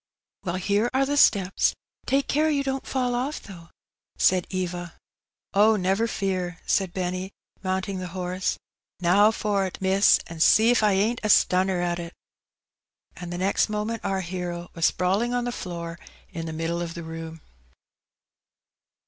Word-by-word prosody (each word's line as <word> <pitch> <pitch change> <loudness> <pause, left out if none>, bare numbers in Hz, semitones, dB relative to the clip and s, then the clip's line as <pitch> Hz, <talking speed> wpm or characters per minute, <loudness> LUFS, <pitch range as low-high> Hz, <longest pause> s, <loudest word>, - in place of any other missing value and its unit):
"Well, 175 -1 -1
here 200 +5 +1
are 270 +1 +3
the 285 +1 -1
steps; 195 -9 +3 0.3
take 275 +1 +2
care 310 +2 +2
you 285 -2 +1
don't 270 -1 -3
fall 255 -2 0
ofi^, 255 +5 -2
though," 170 -4 -12 0.5
said 185 -2 +3
Eva. 175 -2 -4
'• - - -33 0.5
Oh, 215 +2 +5
never 195 +3 +1
fear," 185 -4 -2
said 190 -3 +1
Benny, 185 +1 -3 0.3
mounting 190 0 -2
the 185 - -4
horse. 180 +1 -2 0.2
" - - -68
Now 205 +4 +6
for't, 200 -4 -1
miss, 190 +1 +4
an' 165 -1 -9
see 220 +8 +6
if 245 - +3
I 210 -2 +3
ain't 215 +5 +1
a 215 - 0
stunner 185 -2 +3
at 175 0 -1
it 170 0 -7 0.5
!" - - -46
And 175 -1 -7
the 175 - -4
next 195 +4 +1
moment 215 +1 -3
our 195 -1 -1
hero 175 -1 -5
was 165 -1 +3
sprawUng 200 +7 0
on 245 - -1
the 245 - -2
floor 170 -5 -6 0.3
in 165 0 -5
the - - -4
middle 165 +2 -2
of 170 -1 -5
the 170 - -6
room. 160 0 -8
190 Hz, 170 wpm, -25 LUFS, 175-215 Hz, 0.5 s, Now